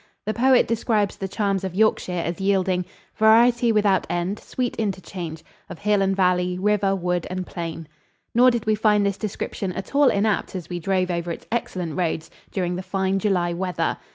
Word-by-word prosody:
The 215 - -1
poet 255 +2 +4
describes 215 -3 0
the 195 - -4
charms 195 0 -1
of 190 -2 -4
Yorkshire 215 -2 +2
as 170 +3 -4
yielding 190 -2 +1 0.3
"Variety 235 +2 +5
without 205 -3 +2
end, 175 +4 -2
sweet 250 -2 -3
interchange 185 -6 -4 0.3
Of - - -7
hill 205 +1 +1
and 195 0 +1
valley, 180 -1 +1
river, 200 0 +2
wood 180 -2 -1
and 185 0 -3
plain." 165 -2 -6 0.5
Nor 250 +2 +6
did 235 -2 -1
we 215 - +3
find 210 -1 +3
this 200 -1 0
description 200 -2 -4
at 190 +7 -7
all 285 -1 +5
inapt 200 -1 0
as 180 -3 -6
we 175 -1 -3
drove 185 +1 0
over 170 0 -2
its - - -7
excellent 180 -9 -3
roads 160 -2 -2 0.2
during 180 -2 -1
the - - -3
fine 190 0 -1
July 180 -4 +1
weather. 180 +1 -1
195 Hz, 180 wpm, -23 LUFS, 180-215 Hz, 0.5 s, Nor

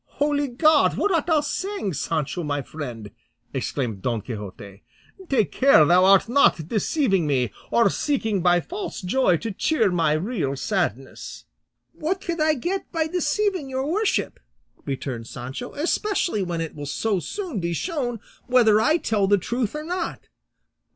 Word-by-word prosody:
"Holy 290 0 +1
God! 295 +4 +3
what 410 - +1
art 330 -2 +1
thou 315 -3 +3
saying, 375 - -3
Sancho, 155 +3 -2
my 145 -3 -2
friend?" 120 -9 -7 0.4
exclaimed 125 -5 -3
Don 115 -1 -1
Quixote. 100 -3 -8 0.5
"Take 230 -7 +2
care 260 - +6
thou 180 +3 +5
art 195 +3 +5
not 230 - +3
deceiving 210 - +1
me, 125 -6 +1 0.2
or 235 -2 +4
seeking 225 -9 0
by 175 0 +4
false 380 - -6
joy 185 -1 +2
to 225 +6 -4
cheer 220 0 +1
my 165 -4 +2
real 155 - -1
sadness." 135 - -3 0.5
"What 360 +5 -2
could 340 -4 -3
I 310 0 +3
get 360 +9 -3
by 325 -1 0
deceiving 360 0 -1
your 265 0 -2
worship," 400 +8 0 0.5
returned 130 -4 -4
Sancho, 130 - -7
"especially 345 - 0
when 175 -3 -2
it 165 - -4
will 145 -1 -7
so 200 +6 0
soon 305 - -4
be 170 -1 -2
shown 250 - -2 0.3
whether 230 -4 +5
I 305 +9 +3
tell 210 - 0
the 205 +1 +4
truth 235 - -2
or 300 - -4
not? 345 +1 -4
215 Hz, 155 wpm, -24 LUFS, -, 0.5 s, care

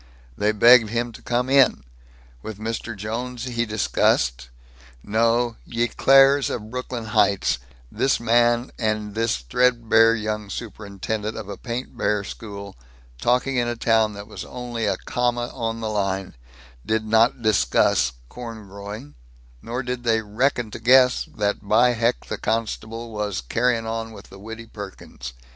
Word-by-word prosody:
They 105 +1 +1
begged 115 +1 +6
him 120 +2 -1
to - - -13
come 120 +1 -1
in. 135 - +4 0.6
With 110 +6 -7
Mr. 115 0 -4
Jones 120 +4 -4
he 120 -2 -2
discussed 60 - +1 0.5
no, 115 +2 +1
ye 120 0 -1
Claires 135 +3 +5
of 110 -1 -5
Brooklyn 125 -2 -5
Heights, 100 - +2 0.3
this 135 - +1
garage 115 - -11
man 120 +1 +3
and 110 -2 -1
this 115 - 0
threadbare 115 - +3
young 105 -1 -3
superintendent 105 0 -5
of - - -7
a 100 - -5
paintbare 115 -4 -2
school, 100 -1 -8 0.5
talking 125 +2 +1
in 120 -1 +1
a 120 - -2
town 110 -2 +2
that 100 0 -8
was 105 - -8
only 120 -3 -4
a 95 -2 0
comma 120 0 -1
on 115 0 -3
the 110 - -2
line, 95 -2 -2 0.5
did 110 - -1
not 115 +2 +3
discuss 60 - +3
corn 115 - -9
growing, 100 -5 -9 0.5
nor 125 +3 -4
did 125 0 -4
they 115 -2 +2
reckon 115 +2 0
to - - -7
guess 125 +2 +5
that 105 -1 -1
by 110 +4 +4
heck 115 +1 0
the - - -5
constabule 115 +1 -3
was 105 -2 -2
carryin' 115 - 0
on 115 0 -4
with 100 -1 -13
the 100 - -12
Widdy 115 +3 -8
Perkins. 95 - -9
115 Hz, 150 wpm, -23 LUFS, 105-120 Hz, 0.6 s, begged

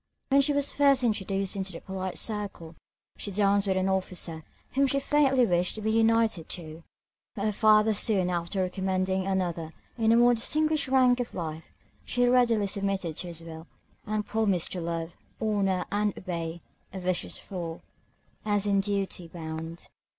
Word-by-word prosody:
When 275 0 +5
she 275 - +2
was 285 0 +1
first 275 -2 +4
introduced 195 -4 0
into 190 -1 -3
the 165 - -7
polite 190 -1 -5
circle, 200 -7 -3 0.4
she - - -5
danced 200 0 +2
with 190 -1 +1
an 190 0 +1
officer, 185 -4 -1 0.3
whom 275 +1 +3
she 275 +1 +1
faintly 270 -3 +3
wished 175 -2 +1
to 215 - -5
be 220 +1 0
united 225 -5 +2
to; 160 -1 -7 0.5
but 200 - -2
her 215 - +2
father 215 +1 +4
soon 200 -3 +2
after 175 +2 -1
recommending 190 0 -1
another 175 -4 -1 0.3
in 225 0 +4
a - - +6
more 240 +1 +6
distinguished 305 +6 +1
rank 255 -1 +4
of 245 - -4
life, 160 -2 -5 0.4
she 245 0 +1
readily 245 -4 +3
submitted 195 -4 -1
to 180 - -3
his 165 -1 -6
will, 165 0 -9 0.4
and 215 0 -1
promised 205 -6 0
to 180 - -3
love, 165 0 -4 0.2
honour, 200 -4 0
and 205 0 0
obey, 170 -2 -4 0.3
(a 190 - -6
vicious 180 -1 -2
fool,) 170 -3 -6 0.6
as 205 -1 +1
in 200 -1 +2
duty 195 -3 -2
bound. 165 0 -7
195 Hz, 165 wpm, -28 LUFS, 175-220 Hz, 0.6 s, a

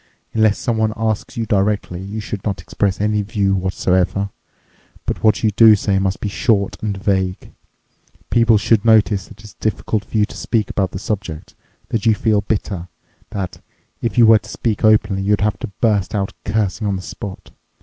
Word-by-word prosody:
Unless 110 -2 +3
someone 110 -3 0
asks 110 0 -2
you 115 - -1
directly, 100 -3 0
you 100 +3 -5
should 105 -2 -5
not 100 -4 -2
express 95 +3 -1
any 105 0 +1
view 100 -2 0
whatsoever. 95 +1 0 0.7
But - - -3
what 110 +1 +3
you 110 - +3
do 110 +1 +7
say 100 -1 0
must 95 0 -1
be - - -1
short 100 +1 0
and 105 -2 -2
vague. 95 -2 -1 0.8
People 115 -2 +5
should 105 +1 +2
notice 110 -3 +3
that 105 - -15
it's 105 - -12
difficult 110 -1 -2
for - - -4
you 105 - +4
to - - -12
speak 110 -3 -1
about 95 -2 0
the 95 - -6
subject, 95 -6 -5 0.4
that 115 0 -1
you 110 - +5
feel 105 -1 +2
bitter, 100 -4 -3 0.4
that, 100 -4 -5 0.4
if 115 - -2
you 120 - +7
were 110 -1 +7
to - - -14
speak 110 -3 -2
openly, 105 -2 +3
you'd 100 +1 +1
have 105 0 0
to - - -4
burst 105 -3 +1
out 100 -1 -1
cursing 105 0 -1
on 100 - 0
the 95 - -5
spot. 95 0 -8
105 Hz, 185 wpm, -19 LUFS, 95-110 Hz, 0.8 s, do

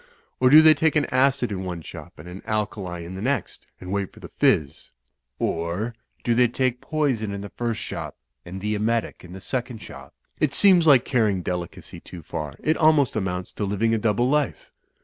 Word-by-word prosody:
Or, 130 - +5
do 155 +3 +9
they 155 0 +8
take 160 -1 +1
an 150 -2 +3
acid 130 -1 +2
in 95 -1 -3
one 90 -3 -5
shop - - -11
and 75 - -11
an 90 +2 -9
alkali 100 -5 -3
in 90 - -8
the 95 - -6
next, 135 +5 -2
and 90 0 -8
wait 100 -1 -2
for - - -16
the - - -10
fizz? 70 -3 +1 0.5
Or, 85 +8 -2 0.3
do 120 - +2
they 125 +1 +4
take 125 +1 -1
the - - -23
poison 135 -9 0
in 100 0 -5
the 100 - -7
first 120 -2 -3
shop - - -6 0.3
and 95 +2 -8
the 105 +1 -1
emetic 115 +2 -1
in 90 0 -11
the 95 - -8
second 120 +3 -4
shop? - - -12 0.2
It 140 -2 +1
seems 185 -5 +5
like 135 -5 +6
carrying 105 -8 +1
delicacy 90 -1 -5
too 85 -3 -11
far. 75 -2 -5
It 155 - +2
almost 155 -4 +3
amounts 90 -3 -3
to - - -5
living 105 +3 0
a 115 - +1
double 110 +3 +1
life." 150 +1 -1
110 Hz, 205 wpm, -24 LUFS, 95-130 Hz, 0.5 s, do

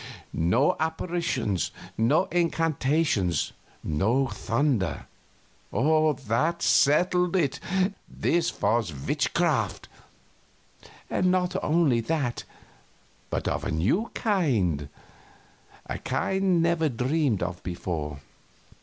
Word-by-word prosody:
No 115 - +2
apparitions, 160 - -1 0.3
no 135 +11 +3
incantations, 155 - +1 0.3
no 110 - +1
thunder. 115 -1 -1 0.7
That 155 +1 +1
settled 180 +5 +3
it. 145 -6 +1 0.5
This 170 0 0
was 110 -2 +2
witchcraft. 65 - 0 1.2
And 185 - +1
not 180 0 +1
only 150 -6 +3
that, 135 0 -2 0.8
but - - -2
of - - -1
a - - -2
new 100 - +1
kind 110 - +1 1.0
a - - -5
kind 190 -3 +1
never 170 -2 +2
dreamed 130 - 0
of 90 -1 -4
before. 80 -5 -4
140 Hz, 85 wpm, -26 LUFS, 105-170 Hz, 1.2 s, no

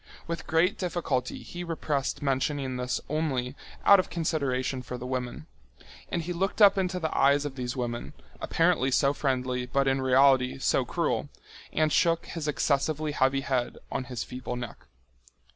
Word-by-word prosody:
With 170 0 -5
great 170 +4 +2
difficulty 160 -8 -2
he 175 0 -7
repressed 150 -5 -2
mentioning 135 -1 0
this 125 0 -2
only 140 -4 -1 0.3
out 200 -1 +8
of 185 - -1
consideration 140 -6 -1
for 125 0 -6
the 125 - -7
women. 125 +2 -4 0.6
And 170 - -2
he 175 +2 -3
looked 190 +5 -1
up 205 -2 +8
into 185 -1 -1
the 160 -2 -2
eyes 140 +1 +4
of 140 -2 -4
these 125 0 -4
women, 120 -1 -3 0.3
apparently 165 -6 +2
so 140 +2 +3
friendly 130 -3 -1
but 140 +2 +1
in 135 0 +2
reality 130 0 +4
so 135 - +1
cruel, - - -1 0.4
and 155 -1 +1
shook 165 -1 +3
his 165 -3 -5
excessively 150 +1 0
heavy 135 -1 +2
head 130 -3 -1
on 130 -1 -2
his 125 -2 -4
feeble 125 -1 -6
neck. 120 - -7
140 Hz, 160 wpm, -28 LUFS, 130-160 Hz, 0.6 s, out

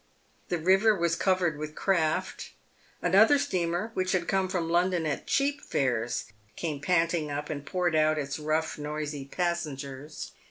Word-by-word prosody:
The 175 - 0
river 190 +6 +4
was 170 -1 +1
covered 180 -6 +1
with 155 0 -6
craft. 165 -5 0 0.5
Another 205 +10 +6
steamer, 180 -2 -1
which 185 -1 0
had 180 -2 0
come 190 -1 +1
from 175 -3 -1
London 175 0 +2
at 150 - -3
cheap 285 +1 +1
fares, 120 -3 -1 0.3
came 150 -4 -3
panting 165 -1 +1
up, 145 +2 -4
and 145 -2 -4
poured 175 +1 0
out 155 0 +3
its 140 -1 -3
rough, 155 +1 -1
noisy 150 -1 -4
passengers. 150 -4 -4
165 Hz, 150 wpm, -28 LUFS, 150-185 Hz, 0.5 s, Another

